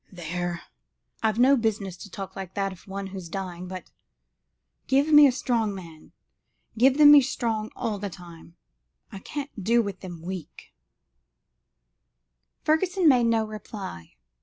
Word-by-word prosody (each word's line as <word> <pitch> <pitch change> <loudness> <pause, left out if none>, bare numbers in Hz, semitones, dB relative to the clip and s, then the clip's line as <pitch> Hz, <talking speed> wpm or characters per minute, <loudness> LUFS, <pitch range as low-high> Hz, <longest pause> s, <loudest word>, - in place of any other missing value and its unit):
There! 175 -1 -4 0.6
I've 220 -1 +1
no 260 +3 +6
business 215 -6 -1
to 200 - -11
talk 195 0 -8
like 190 -1 -7
that 195 -1 -1
of 185 +1 -14
one 195 0 -5
who's 190 -3 -8
dying, 180 -1 -5
but 185 0 -8 1.0
give 280 +3 +2
me 295 -1 +9
a - - +3
strong 230 -5 -1
man, 165 -4 -12 0.6
give 260 +4 +4
them 295 -1 +9
me 295 -1 +9
strong 230 -5 -2
all 210 -3 -3
the 200 0 -4
time 170 -1 -13 0.6
I 195 - -8
can't 280 -2 -7
do 235 +4 +3
with 200 -3 -6
them 175 -3 -9
weak." 180 -3 -8 1.9
Fergusson 355 +3 +2
made 250 -5 +5
no 225 -1 +2
reply. 205 - -8
200 Hz, 145 wpm, -26 LUFS, 185-245 Hz, 1.9 s, me